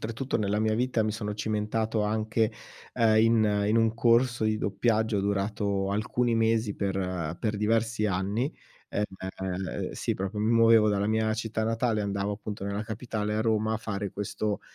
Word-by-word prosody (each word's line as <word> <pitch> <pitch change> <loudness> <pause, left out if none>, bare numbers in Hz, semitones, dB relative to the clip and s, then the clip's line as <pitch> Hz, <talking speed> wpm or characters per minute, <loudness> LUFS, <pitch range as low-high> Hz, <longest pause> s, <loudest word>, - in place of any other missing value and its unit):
oltretutto 115 +4 -2
nella 105 0 0
mia 110 0 +1
vita 120 -1 +1
mi 105 0 -1
sono 105 -2 -4
cimentato 110 +1 -1
anche, 110 +1 0 0.4
ehm, 110 -2 +4
in 110 -3 +3
in 110 - +3
un 115 -1 +3
corso 120 0 +3
di 110 0 +2
doppiaggio 110 0 +1
durato 100 0 -1
alcuni 115 +3 0
mesi 115 -2 +1
per 90 -4 -2
per 105 -2 -1
diversi 110 0 +1
anni, 100 - -1 0.4
ehm, 95 -2 -4
sì, - - -2
proprio 100 +2 -4
mi 110 - +1
muovevo 115 -2 +6
dalla 100 0 +1
mia 110 0 +1
città 110 -1 -2
natale, 115 0 0
andavo 100 0 -1
appunto 105 -1 -6
nella 100 +1 -2
capitale, 110 -1 -3
a 110 - 0
Roma, 110 0 +1
a - - 0
fare 100 -3 -4
questo 105 +1 -3
110 Hz, 165 wpm, -28 LUFS, 100-115 Hz, 0.4 s, muovevo